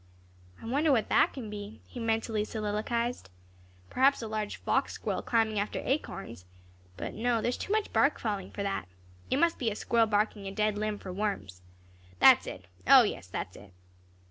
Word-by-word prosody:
"I - - -11
wonder 285 +6 +2
what 235 -5 +2
that - - +4
can 230 -6 -7
be?" 205 +1 -7
he 245 - -9
mentally 225 -1 0
soliloquized. 220 - -2 0.6
"Perhaps 270 0 +3
a - - -4
large 215 -1 -3
fox - - 0
squirrel - - -3
climbing 220 -3 +1
after 205 - -2
acorns 195 - -3 0.5
but - - -5
no, 235 +1 +1
there 230 - 0
is 245 - -2
too - - -5
much 430 -1 0
bark 280 - +3
falling 205 -4 -3
for 200 - -5
that. 195 - -2 0.4
It - - +2
must 335 +3 +2
be 240 - +1
a 210 - -4
squirrel 230 +1 +2
barking 210 -1 0
a - - -4
dead 210 +1 0
limb 210 0 -2
for 185 -2 -8
worms. 180 - -3 0.6
That's - - +7
it! 90 -1 -7 0.2
O, 265 -1 +9
yes, 150 - -3
that's 95 0 -5
it." 100 -2 -14
215 Hz, 185 wpm, -30 LUFS, 205-240 Hz, 0.6 s, O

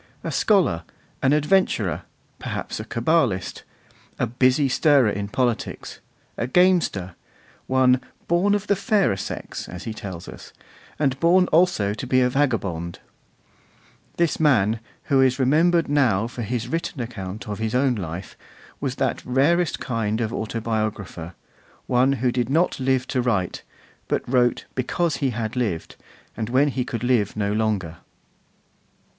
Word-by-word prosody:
A - - -3
scholar, 185 - +2 0.4
an 135 - +3
adventurer, 150 - +2 0.4
perhaps - - -4
a - - -4
Cabalist, 115 - 0 0.6
a - - +1
busy 130 +4 +2
stirrer 135 -4 +4
in 100 0 -3
politics, 120 +2 -2 0.4
a 115 - -1
gamester, 165 - +2 0.5
one 130 -1 +3 0.3
'born 195 +5 +3
for 205 - -9
the 200 - +2
fairer 200 - +2
sex,' 95 - -6
as 90 - -8
he 110 - -4
tells 95 -5 -7
us, - - -11 0.4
and 135 -3 0
born 180 +3 +5
also 160 - +3
to 120 +4 -6
be 130 0 +3
a 125 0 +2
vagabond; 100 - -1 1.2
this 170 -2 +1
man, 115 -8 +3 0.2
who 135 -1 +3
is 130 -1 +3
remembered 160 +6 +3
now 125 -8 +2
for 120 +1 -6
his 120 +1 -3
written 165 0 -3
account 110 -5 -6
of 105 0 -4
his 110 +1 -2
own 130 0 +3
life, 90 -3 -6 0.4
was 135 -2 -2
that 130 -3 -1
rarest 150 +7 +2
kind 110 -2 -2
of 115 -1 -2
autobiographer, 110 -6 -3 0.5
one 130 +2 +3
who 125 -1 0
did 120 -1 -1
not 165 +3 +1
live 130 -1 +1
to 130 -1 -1
write, 100 -8 -1 0.5
but - - -1
wrote 120 -1 +2
because 155 +5 -1
he 140 - 0
had 115 -2 -3
lived, 105 -10 -2 0.4
and 110 0 -3
when 135 +4 +3
he 130 -2 -1
could 120 -1 -5
live 120 -5 +1
no 100 -1 0
longer. 105 -7 -1
125 Hz, 145 wpm, -23 LUFS, 110-145 Hz, 1.2 s, born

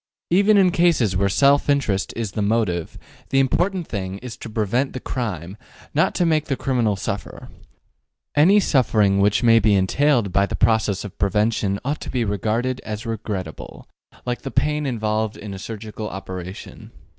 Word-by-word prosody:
Even 200 +4 +5
in 185 -2 +5
cases 165 - +2
where 100 +2 +2
self 140 +7 +3
interest 110 -9 +1
is 115 -4 -3
the 105 - -3
motive, 100 -6 -1 0.3
the 135 - +2
important 175 +7 +1
thing 95 -2 -4
is 120 +2 -8
to - - -9
prevent 115 +5 -1
the 130 - -4
crime, 100 -8 -4 0.4
not - - +2
to 175 - +2
make 155 -2 +2
the 135 - -1
criminal 120 -6 0
suffer. 95 - -6 0.8
Any 180 +8 +5
suffering 110 - +2
which 100 +4 +2
may 115 -1 +6
be 105 -1 +3
entailed 115 +3 +2
by 100 +2 +2
the - - -3
process 110 -3 +1
of 105 - -10
prevention 100 0 +1
ought 145 +3 -2
to - - -7
be 120 -3 -1
regarded 115 +5 -1
as 110 +2 -6
regrettable, 100 -7 -6 0.4
like 125 -1 -3
the 135 - -5
pain 150 +3 0
involved 110 -3 -1
in 105 -2 -7
a 95 - -7
surgical 110 +1 -6
operation. 95 -1 -8
110 Hz, 170 wpm, -22 LUFS, 100-135 Hz, 0.8 s, may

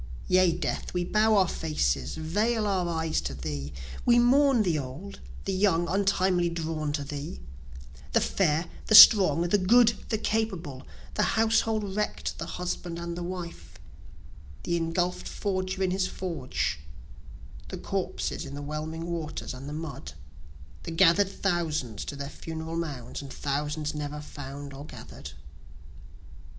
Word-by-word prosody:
Yea, 185 -1 +5
Death, 170 +1 -3
we 180 - +1
bow 215 +4 +3
our 190 -2 +4
faces, 70 - -1
veil 210 +8 0
our 185 -4 0
eyes 160 -1 0
to 65 0 -4
thee, 70 +1 -5 0.3
We 240 -1 +5
mourn 255 0 +5
the 170 -6 +1
old, 140 +10 -7 0.3
the 195 - -1
young 185 -3 +2
untimely 185 -1 +2
drawn 160 -2 -3
to 145 -1 -2
thee, 140 - -6 0.7
The - - +5
fair, 165 -3 +1 0.2
the 215 - +5
strong, 190 -8 +10
the 175 +4 +2
good, 230 +5 +5 0.2
the 220 - +1
capable, 190 -12 -2 0.3
The - - +1
household 220 -2 +2
wreck'd, 210 0 -2
the - - -4
husband 180 -1 -4
and 170 0 -4
the 175 - -5
wife, 175 -1 -7 0.9
the 170 - 0
engulfed 170 +2 -1
forger 185 -1 -2
in 185 - +1
his 185 0 +1
forge, 165 -11 -3 0.9
The - - -6
corpses - - -3
in 140 - -7
the 145 - -6
whelming 155 +2 -4
waters 165 -5 -4
and 130 +3 -8
the - - -6
mud, 155 -1 -6 0.7
The - - -7
gather'd 180 +3 +4
thousands 160 - -2
to 145 - -5
their 140 0 -5
funeral 160 +1 -6
mounds, 145 -9 -4
and 140 -1 -9
thousands 150 +2 -2
never 150 0 -4
found 145 -1 -8
or 135 +1 -8
gather'd. 155 - -10
170 Hz, 145 wpm, -28 LUFS, 150-190 Hz, 0.9 s, strong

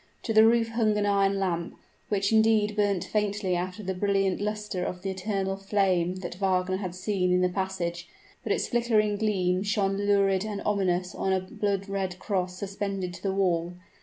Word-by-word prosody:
To 225 - -1
the 220 0 +7
roof 230 0 +3
hung 225 -2 +1
an 205 - +1
iron 200 -1 +2
lamp, 175 -3 -2 0.3
which 200 +1 +1
indeed 220 -1 +3
burnt 205 -3 +1
faintly 205 -3 -1
after 185 +4 -4
the 190 0 -2
brilliant 195 0 +1
luster 210 -3 -3
of 180 0 -5
the 195 - -1
eternal 195 0 -2
flame 190 -3 +1
that 175 0 -6
Wagner 185 -1 +1
had 185 -3 -5
seen 185 -1 0
in 180 0 +3
the 180 - +3
passage; 180 -2 -3 0.3
but - - -3
its - - +1
flickering 220 -3 +2
gleam 185 -4 +1
shone 200 -1 0
lurid 200 -1 +2
and 210 -2 -4
ominous 185 -3 0
on 190 - -1
a 190 - +2
blood 195 +1 -2
red 190 -2 -3
cross 185 -2 -2
suspended 195 -2 -3
to 175 - -10
the 195 - -1
wall. 175 -3 0
195 Hz, 185 wpm, -27 LUFS, 185-205 Hz, 0.3 s, the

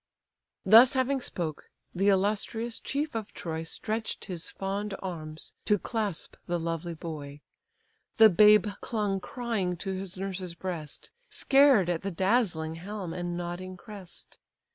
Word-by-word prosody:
Thus 230 +7 +8
having 265 +1 +1
spoke, 160 -9 -4 0.2
the 195 +3 +1
illustrious 215 +4 0
chief 295 +1 -2
of 220 -2 -5
Troy 160 -1 -4
Stretch'd 220 +7 -3
his 175 -4 -5
fond 195 +1 -3
arms 160 -4 -6
to 210 - +4
clasp 210 -4 -3
the 175 - 0
lovely 165 +1 -3
boy. 150 -3 -7 0.8
The 220 -2 +9
babe 210 +3 +7 0.2
clung 205 -4 -1
crying 205 -6 -2
to 195 +2 -3
his 190 0 -6
nurse's 185 -2 -4
breast, 170 -5 -6 0.2
Scared 270 -9 +5
at 175 -2 0
the 195 - -2
dazzling 180 -4 +1
helm, 195 -3 -5
and 175 -1 -3
nodding 175 +1 -5
crest. 195 -2 -10
190 Hz, 135 wpm, -29 LUFS, 175-215 Hz, 0.8 s, The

